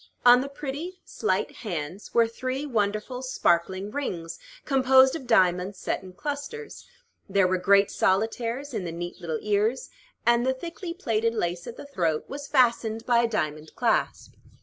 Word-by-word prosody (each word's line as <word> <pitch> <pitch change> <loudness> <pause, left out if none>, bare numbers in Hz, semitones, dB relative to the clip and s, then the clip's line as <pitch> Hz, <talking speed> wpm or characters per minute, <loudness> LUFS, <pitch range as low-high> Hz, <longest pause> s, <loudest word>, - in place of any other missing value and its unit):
On 245 +1 +8
the 275 - -4
pretty, 295 +6 -6
slight - - -1
hands 180 -3 -5
were 230 -1 +4
three 255 +4 -4
wonderful, 215 0 -1
sparkling 190 -5 0
rings, 175 -13 -4 0.3
composed 265 0 +5
of 265 -6 -7
diamonds 185 -3 +3
set - - -2
in 185 -1 -12
clusters: 290 - -6 0.4
there 195 -1 +3
were 185 0 +1
great 200 +1 +4
solitaires 230 +7 0
in 210 -4 -2
the 170 - -4
neat 175 +2 -6
little 160 -3 -2
ears, 210 +4 0 0.3
and 235 0 +4
the 260 +1 +1
thickly 335 +4 -6
plaited 230 - 0
lace 175 -4 -2
at 240 - -7
the - - -9
throat 170 - -1
was 285 +1 -7
fastened 230 -4 +2
by 240 -1 +4
a 235 - +3
diamond 155 -7 -3
clasp. - - 0
230 Hz, 160 wpm, -26 LUFS, 185-265 Hz, 0.4 s, On